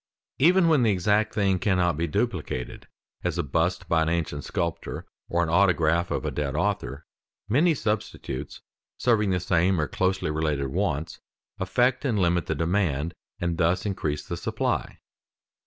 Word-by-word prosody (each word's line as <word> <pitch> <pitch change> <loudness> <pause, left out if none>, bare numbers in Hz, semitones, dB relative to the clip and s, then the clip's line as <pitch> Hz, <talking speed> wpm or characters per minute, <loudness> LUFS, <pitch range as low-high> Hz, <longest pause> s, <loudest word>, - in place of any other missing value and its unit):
Even 175 +5 +5
when 155 -5 +4
the 115 - +3
exact 105 +2 +2
thing 100 -3 +1
cannot 90 -4 +2
be 85 +3 -1
duplicated, 60 -4 -3 0.4
as - - -1
a - - +1
bust 85 +6 0
by 80 -1 +3
an 80 - +1
ancient 80 -4 -2
sculptor 85 -2 -3 0.2
or 85 0 +2
an 80 - -2
autograph 85 -1 +3
of - - -2
a - - -1
dead 75 -1 -2
author, 80 -6 -2 0.4
many 155 +10 +3
substitutes 105 - -3 0.4
serving 110 -4 +2
the 90 -1 +1
same 90 +1 +2
or 75 - 0
closely 95 -4 0
related 75 -3 -1
wants, 80 -2 -2 0.4
affect 125 +7 +1
and 125 -7 +1
limit 85 -3 +1
the 80 - -1
demand, 85 -1 0 0.3
and 85 -1 -2
thus 85 +3 +2
increase 75 -7 -2
the 85 - -3
supply. 85 - -2
85 Hz, 155 wpm, -26 LUFS, 80-100 Hz, 0.4 s, Even